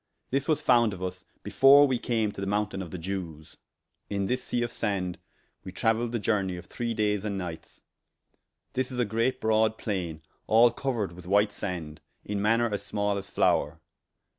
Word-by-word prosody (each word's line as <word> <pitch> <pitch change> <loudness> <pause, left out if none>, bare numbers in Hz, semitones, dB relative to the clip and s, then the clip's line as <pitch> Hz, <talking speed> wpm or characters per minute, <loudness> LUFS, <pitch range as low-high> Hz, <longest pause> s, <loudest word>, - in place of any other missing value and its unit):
This 135 +1 0
was 155 -2 +1
founde 120 -4 +4
of - - -11
vs 90 0 -5 0.2
before 140 +2 +7
we 130 -3 0
came 110 -4 0
to 100 - -8
the 100 - -2
mountayne 105 -1 -1
of 90 - -6
the 90 - -6
Jewes. 85 -3 -6 0.5
In 100 -1 -1
this 125 +5 -1
sea 120 - -1
of 120 - -3
sande 95 -5 -2 0.4
we 95 - -7
traueiled 115 +4 +1
the 120 - 0
journey 100 -4 0
of 90 - -9
three 115 +3 -3
days 105 -2 0
and 100 -2 -2
nightes: 85 -3 -7 0.9
this 130 +1 -1
is 125 - -5
a 120 - +2
great 115 +4 0
brode 110 0 +2
plaine, 85 -7 -4 0.2
all 115 +2 +6
couered 120 -6 -2
with 90 0 -12
white 100 +2 +3
sande, 80 -7 -5 0.2
in 100 -1 -2
maner 115 +3 +3
as 100 - -2
small 105 -1 -1
as 100 - -6
floure. - - +1
105 Hz, 190 wpm, -28 LUFS, 95-115 Hz, 0.9 s, before